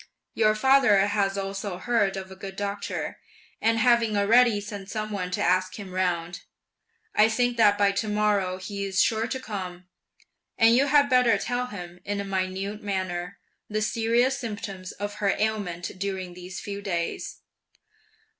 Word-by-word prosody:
Your 215 -1 +3
father 265 -2 +5
has 200 0 +1
also 195 -1 -4
heard 200 -2 +1
of 190 0 -7
a - - -9
good 190 0 -8
doctor, 200 0 -4 0.4
and 225 0 +3
having 230 -2 +3
already 225 +2 +5
sent 205 -1 -8
some 215 0 -3
one 185 -3 -3
to 180 - -1
ask 185 +1 +1
him 200 -3 -8
round, 175 -2 -1 0.7
I 215 +1 +5
think 245 +2 +1
that 205 -3 +5
by 200 -1 +4
to 200 +2 -2
morrow 210 -3 +1
he's 195 0 -3
sure 225 0 +2
to 260 - -3
come; 185 -6 -6 0.7
and 225 +1 +6
you 275 +3 +4
had 285 0 +5
better 250 -5 +4
tell 245 +4 -2
him, 180 -5 -8
in 205 0 -3
a - - -2
minute 195 +2 -3
manner, 185 -2 -3 0.3
the 215 0 -1
serious 235 +5 +1
symptoms 205 -6 -6
of 205 +1 -6
her 200 -1 +2
ailment 205 -5 -2
during 190 -2 -3
these 180 +1 -8
few 200 0 -6
days." 170 -4 -3
205 Hz, 160 wpm, -26 LUFS, 190-225 Hz, 0.7 s, and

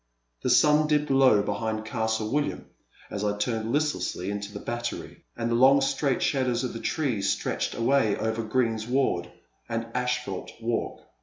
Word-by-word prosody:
The - - -1
sun 150 +4 +5
dipped 150 -1 +1
low 130 -6 +5
behind 110 +1 -2
Castle 110 -1 -1
William 145 +1 -1 0.5
as 100 - -3
I 105 0 0
turned 110 +1 -1
listlessly 145 -10 -1
into 100 0 -5
the 100 - -7
Battery, 120 +2 -5
and 115 0 -1
the - - +2
long 130 +4 +6
straight 135 0 0
shadows 130 -3 +1
of 125 - -3
the 115 - -5
trees 125 -12 -1
stretched - - -2
away 115 -2 +2
over 110 +1 -1
greensward 115 +2 0 0.4
and 115 0 -2
asphalt 125 -6 -2
walk. 115 0 -2
115 Hz, 155 wpm, -27 LUFS, 110-135 Hz, 0.5 s, long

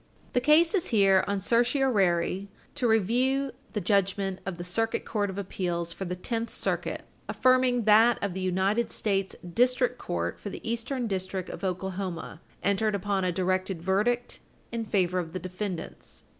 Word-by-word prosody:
The 245 - +2
case 310 - +5
is 380 -5 +2
here 195 -4 +4
on 200 0 0
certiorari 200 -6 +2 0.2
to 245 - 0
review 250 +6 +2 0.2
the 210 - -1
judgment 195 0 +1
of 185 -3 -3
the 175 - -5
Circuit 225 +6 -1
Court 205 -2 -1
of 190 - -6
Appeals 175 -3 -2
for 195 - -5
the 180 0 -3
Tenth 230 +5 -3
Circuit - - -3 0.2
affirming 255 -1 +3
that 220 +3 +6
of 200 -3 -1
the 190 - -4
United 190 +5 +1
States 195 -2 -1
District 250 +5 +2
Court 85 0 -3
for - - -6
the - - -8
Eastern 235 +2 -2
District 190 -3 -3
of 175 - -9
Oklahoma, 185 -3 -4 0.2
entered 200 +2 +2
upon 200 0 -1
a 180 - +1
directed 185 0 -1
verdict 215 +6 0 0.3
in 230 -1 -3
favor 185 -3 +1
of 165 -2 -5
the - - -2
defendants. 185 0 -6
200 Hz, 160 wpm, -28 LUFS, 185-235 Hz, 0.3 s, that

